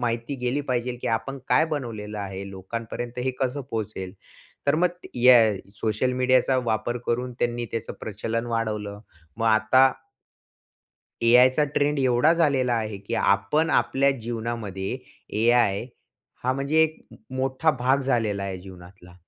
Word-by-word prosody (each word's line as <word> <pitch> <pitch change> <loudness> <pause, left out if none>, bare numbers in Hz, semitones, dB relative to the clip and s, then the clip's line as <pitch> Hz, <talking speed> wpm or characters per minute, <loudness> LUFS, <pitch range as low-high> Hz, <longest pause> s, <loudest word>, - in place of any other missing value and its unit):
माहिती 120 +3 -2
गेली 125 +4 0
पाहिजे, 125 -3 -2
की - - -6
आपण 115 +5 -2
काय 160 - +4
बनवलेलं 115 -9 -5
आहे? 100 -1 -5
लोकांपर्यंत 115 +5 -6
हे 130 - +1
कसं 135 +2 -1
पोहोचेल?" 105 -4 -4 0.5
तर 140 - +4
मग 180 +3 +3 0.3
याय 120 -5 +6 0.2
सोशल 110 +4 0
मीडियाचा 130 +1 +3
वापर 115 +2 -1
करून 125 +2 -1
त्यांनी 120 0 -1
त्याचं 115 0 -4
प्रचलन 115 +2 -3
वाढवलं. 105 -3 -3 0.4
मग 115 - -1
आता 110 +4 +5 1.3
एआयचा 125 +5 +5
ट्रेंड 145 0 +1
एवढा 130 +4 +4
झालेला 140 -7 +2
आहे, 110 -3 -3
की 100 +4 -5
आपण 105 +12 +2
आपल्या 140 +1 +3
जीवनामध्ये 115 -2 -4 0.4
एआय 115 -2 +3 0.6
हा 130 - +2
म्हणजे 140 +4 +2
एक 160 0 0 0.4
मोठा 135 +4 +1
भाग 130 +3 +2
झालेला 115 -7 0
आहे 95 -2 -4
जीवनातला. 90 -1 -14
120 Hz, 135 wpm, -25 LUFS, 110-130 Hz, 1.3 s, याय